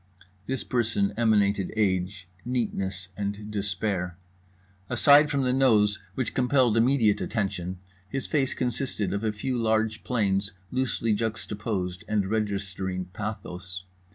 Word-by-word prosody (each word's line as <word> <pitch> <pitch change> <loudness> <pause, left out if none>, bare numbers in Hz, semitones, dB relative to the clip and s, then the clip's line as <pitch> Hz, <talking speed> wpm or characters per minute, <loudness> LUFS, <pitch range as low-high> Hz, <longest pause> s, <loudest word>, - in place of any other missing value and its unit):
This 130 0 -2
person 110 -5 0
emanated 105 -4 +2
age, 95 -2 0 0.2
neatness 95 -7 -2
and 105 +1 -4
despair. 100 -3 -2 0.7
Aside 145 +1 +6
from 140 -2 +1
the 125 0 +2
nose 110 -6 +4 0.2
which 130 - -1
compelled 125 -3 +3
immediate 115 -3 +3
attention, 95 -4 -2 0.3
his 135 +4 -3
face 135 -4 +1
consisted 120 -6 -1
of 100 +2 -2
a 110 - +1
few 120 +4 -2
large 110 -1 +1
planes 100 -4 0 0.2
loosely 130 -3 0
juxtaposed 105 -4 -2
and 105 -3 +1
registering 95 -4 -2
pathos. 95 -4 -5
105 Hz, 120 wpm, -27 LUFS, 95-120 Hz, 0.7 s, Aside